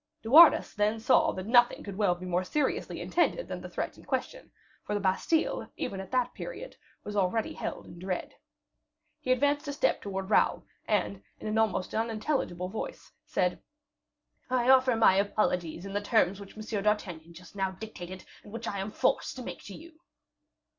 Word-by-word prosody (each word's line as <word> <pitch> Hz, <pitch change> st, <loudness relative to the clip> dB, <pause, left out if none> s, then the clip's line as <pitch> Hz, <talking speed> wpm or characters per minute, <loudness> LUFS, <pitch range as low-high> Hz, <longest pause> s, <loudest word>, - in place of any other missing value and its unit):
De 225 Hz, -, -5 dB
Wardes 320 Hz, +2 st, +8 dB
then 210 Hz, +1 st, +1 dB
saw 315 Hz, +8 st, +4 dB
that 185 Hz, -, -6 dB
nothing 240 Hz, +2 st, +4 dB
could 200 Hz, -2 st, -7 dB
well 195 Hz, -3 st, +2 dB
be 180 Hz, +1 st, -9 dB
more 180 Hz, 0 st, 0 dB
seriously 275 Hz, +9 st, -1 dB
intended 425 Hz, +8 st, 0 dB
than -, -, -5 dB
the -, -, -8 dB
threat -, -, -4 dB
in -, -, -15 dB
question, -, -, -3 dB, 0.3 s
for 210 Hz, -, -3 dB
the -, -, 0 dB
Bastile, 200 Hz, -, 0 dB
even 195 Hz, -, -3 dB
at 190 Hz, -1 st, -7 dB
that 250 Hz, -2 st, 0 dB
period, -, -, -7 dB, 0.3 s
was 210 Hz, -, -6 dB
already 205 Hz, +3 st, 0 dB
held -, -, -5 dB
in 170 Hz, -, -12 dB
dread. 185 Hz, 0 st, -4 dB, 0.9 s
He 255 Hz, -, -1 dB
advanced 285 Hz, +4 st, +2 dB
a 285 Hz, -, -2 dB
step 290 Hz, -, +1 dB
towards 195 Hz, -1 st, -4 dB
Raoul, -, -, +3 dB, 0.2 s
and, 200 Hz, -2 st, 0 dB, 0.2 s
in -, -, -10 dB
an 215 Hz, +1 st, 0 dB
almost 210 Hz, -4 st, 0 dB
unintelligible 220 Hz, -, -1 dB
voice, 225 Hz, -, -6 dB, 0.2 s
said, -, -, 0 dB, 0.9 s
"I 250 Hz, 0 st, +2 dB
offer 260 Hz, -2 st, +5 dB
my 220 Hz, -4 st, +5 dB
apologies 180 Hz, -4 st, 0 dB
in 195 Hz, -, -6 dB
the 205 Hz, -, 0 dB
terms 205 Hz, -3 st, +2 dB
which 200 Hz, +1 st, -12 dB
M. 215 Hz, -1 st, -3 dB
d'Artagnan 175 Hz, -6 st, -1 dB
just 180 Hz, +3 st, -14 dB
now 195 Hz, -1 st, 0 dB
dictated, 185 Hz, -2 st, -9 dB, 0.2 s
and 205 Hz, -, -13 dB
which 230 Hz, +1 st, -6 dB
I 200 Hz, -, -3 dB
am 195 Hz, +2 st, -3 dB
forced 270 Hz, -, 0 dB
to 255 Hz, -, -7 dB
make -, -, -7 dB
to 200 Hz, -, -8 dB
you." 325 Hz, 0 st, -14 dB
210 Hz, 185 wpm, -29 LUFS, 190-255 Hz, 0.9 s, Wardes